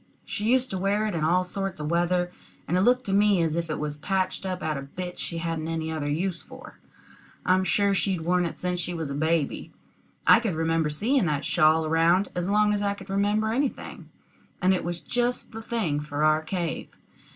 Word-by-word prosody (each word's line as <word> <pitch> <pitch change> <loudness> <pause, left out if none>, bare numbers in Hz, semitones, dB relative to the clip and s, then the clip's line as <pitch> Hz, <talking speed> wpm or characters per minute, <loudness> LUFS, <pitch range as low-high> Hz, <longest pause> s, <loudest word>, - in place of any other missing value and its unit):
She 215 -1 -4
used 255 +2 +2
to 190 - -2
wear 200 +3 +1
it 215 - -2
in 160 -2 -1
all 180 +4 +3
sorts 195 -1 -4
of 150 +1 -3
weather, 175 +1 +1 0.4
and 175 - 0
it 185 - +3
looked 250 +5 +3
to 195 - -1
me 205 -1 +4
as 160 -1 0
if 170 -1 -2
it 155 - -2
was 150 -1 -4
patched 190 +4 -1
up 185 0 -4
out 155 -1 -1
of 140 0 -8
bits 180 0 -3
that 180 - -13
she 170 - -3
hadn't 165 -1 -3
any 160 -1 -2
other 150 -2 -2
use 170 +3 -1
for. - - -13 0.7
I'm 185 +1 +3
sure 200 +3 +2
she'd 190 -3 0
worn 180 +2 +2
it - - -8
since 180 0 -2
she 175 0 -3
was 160 -4 -4
a - - -2
baby. 155 0 -1 0.5
I - - +8
could 220 -7 -2
remember 160 -1 +1
seeing 215 - +1
that 150 -1 -1
shawl 155 +1 +3
around 165 +5 +3
as 180 +1 -2
long 210 +1 +3
as 205 - -1
I 200 0 0
could 195 -1 -10
remember 210 +2 +1
anything, 275 +2 -3 0.5
and 185 +1 +3
it 185 - -1
was 175 0 -4
just 245 0 -1
the 225 -1 -7
thing 215 -11 -1
for 150 0 -3
our 155 0 +4
cave. 170 0 -3
180 Hz, 220 wpm, -26 LUFS, 160-200 Hz, 0.7 s, I